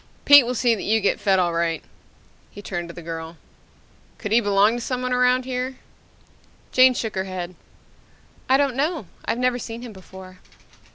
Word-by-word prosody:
"Pete 285 Hz, -4 st, +8 dB
will 250 Hz, -, -2 dB
see 240 Hz, 0 st, +2 dB
that 220 Hz, -, -4 dB
you 220 Hz, +2 st, +1 dB
get 200 Hz, -, 0 dB
fed 195 Hz, -2 st, +2 dB
all 175 Hz, -2 st, +1 dB
right." 165 Hz, -1 st, -1 dB, 0.7 s
He 205 Hz, -, -12 dB
turned 175 Hz, -3 st, -5 dB
to -, -, -8 dB
the 175 Hz, -, -9 dB
girl. 165 Hz, 0 st, -7 dB, 0.8 s
"Could 210 Hz, -, -6 dB
he 225 Hz, -, +5 dB
belong 205 Hz, +1 st, +3 dB
to -, -, -5 dB
someone 250 Hz, +1 st, -2 dB
around 250 Hz, 0 st, +2 dB
here?" 255 Hz, 0 st, -3 dB, 1.0 s
Jane 255 Hz, 0 st, +5 dB
shook 225 Hz, -2 st, -3 dB
her 190 Hz, 0 st, -2 dB
head. 185 Hz, -1 st, -6 dB, 1.0 s
"I 265 Hz, -, +5 dB
don't 280 Hz, -3 st, 0 dB
know. 300 Hz, -, -1 dB, 0.2 s
I've -, -, -1 dB
never 250 Hz, 0 st, 0 dB
seen 230 Hz, 0 st, -7 dB
him 235 Hz, -3 st, -9 dB
before." 185 Hz, -1 st, -13 dB
225 Hz, 180 wpm, -22 LUFS, 185-250 Hz, 1.0 s, Pete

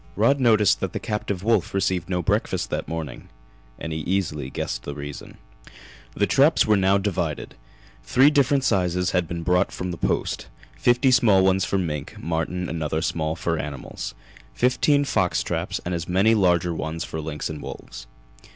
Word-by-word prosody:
Rod 115 Hz, +7 st, +3 dB
noticed 110 Hz, -5 st, +4 dB
that -, -, -3 dB
the -, -, -2 dB
captive 100 Hz, -3 st, -3 dB
wolf 110 Hz, -5 st, +1 dB
received 95 Hz, -3 st, 0 dB
no 90 Hz, -1 st, -1 dB
breakfast -, -, -1 dB
that -, -, -2 dB
morning, 80 Hz, -6 st, -6 dB, 0.5 s
and 80 Hz, -, -5 dB
he 80 Hz, -, -3 dB
easily 75 Hz, -5 st, -2 dB
guessed -, -, -4 dB
the 70 Hz, -, -6 dB
reason. 70 Hz, -1 st, -8 dB, 0.8 s
The -, -, +2 dB
traps -, -, +4 dB
were 110 Hz, -, +4 dB
now 95 Hz, 0 st, +3 dB
divided. 100 Hz, -2 st, -2 dB, 0.5 s
Three 135 Hz, +4 st, +5 dB
different 140 Hz, -2 st, +3 dB
sizes 90 Hz, -5 st, +1 dB
had 90 Hz, -2 st, +1 dB
been 85 Hz, -1 st, -5 dB
brought 90 Hz, +3 st, +2 dB
from 90 Hz, 0 st, -4 dB
the 85 Hz, -, -5 dB
Post -, -, -1 dB, 0.3 s
fifty 120 Hz, -, +3 dB
small 110 Hz, -7 st, +5 dB
ones 95 Hz, 0 st, +3 dB
for 100 Hz, -, 0 dB
mink, 75 Hz, -6 st, -3 dB
marten 85 Hz, +2 st, -2 dB
and 80 Hz, +1 st, -4 dB
other 80 Hz, +1 st, -1 dB
small 80 Hz, -1 st, -1 dB
fur 80 Hz, 0 st, -2 dB
animals; 70 Hz, -2 st, -6 dB, 0.4 s
fifteen 140 Hz, -, +2 dB
fox 95 Hz, -9 st, +1 dB
traps, -, -, -2 dB
and 90 Hz, -, -2 dB
as 85 Hz, 0 st, -4 dB
many 95 Hz, +5 st, +4 dB
larger 90 Hz, -4 st, +2 dB
ones 80 Hz, +1 st, -4 dB
for 80 Hz, -, -5 dB
lynx 75 Hz, -1 st, -4 dB
and 75 Hz, -1 st, -6 dB
wolves. -, -, -9 dB
90 Hz, 175 wpm, -24 LUFS, 80-105 Hz, 0.8 s, Three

